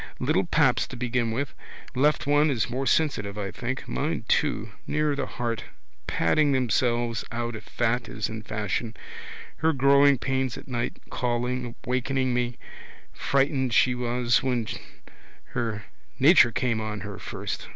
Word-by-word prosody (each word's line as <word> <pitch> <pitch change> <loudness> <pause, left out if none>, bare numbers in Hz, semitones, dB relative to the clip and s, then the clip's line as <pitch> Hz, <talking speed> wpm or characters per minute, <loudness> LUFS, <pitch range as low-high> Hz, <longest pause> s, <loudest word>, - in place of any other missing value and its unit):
Little - - +1
paps - - +3
to - - -8
begin 120 -1 0
with. 135 +5 -2 0.4
Left 145 +3 +2
one 145 +2 +4
is 125 -6 0
more 130 +2 -1
sensitive, 105 -10 +1
I 100 -2 -3
think. 125 +2 -4
Mine 60 - -2
too. - - +1 0.2
Nearer 150 -1 +1
the 140 -2 -2
heart? 115 -2 -3 0.4
Padding 145 - +2
themselves 120 -2 +1
out 120 0 -3
if 110 - -9
fat 120 +1 -1
is 105 - -2
in 110 0 -6
fashion. 110 +2 -3 0.6
Her 160 +1 +2
growing 140 +1 +5
pains 130 0 -1
at - - -11
night, 120 -2 -2
calling, 125 0 -1
wakening 130 +1 0
me. 120 0 -1 0.6
Frightened 135 -2 +1
she 125 - +5
was 120 -1 +1
when 125 -3 0 0.9
her 110 -3 -2 0.3
nature 135 -4 +7
came 115 -2 0
on 105 -2 -4
her - - -7
first. - - -5
125 Hz, 145 wpm, -26 LUFS, 115-135 Hz, 0.9 s, nature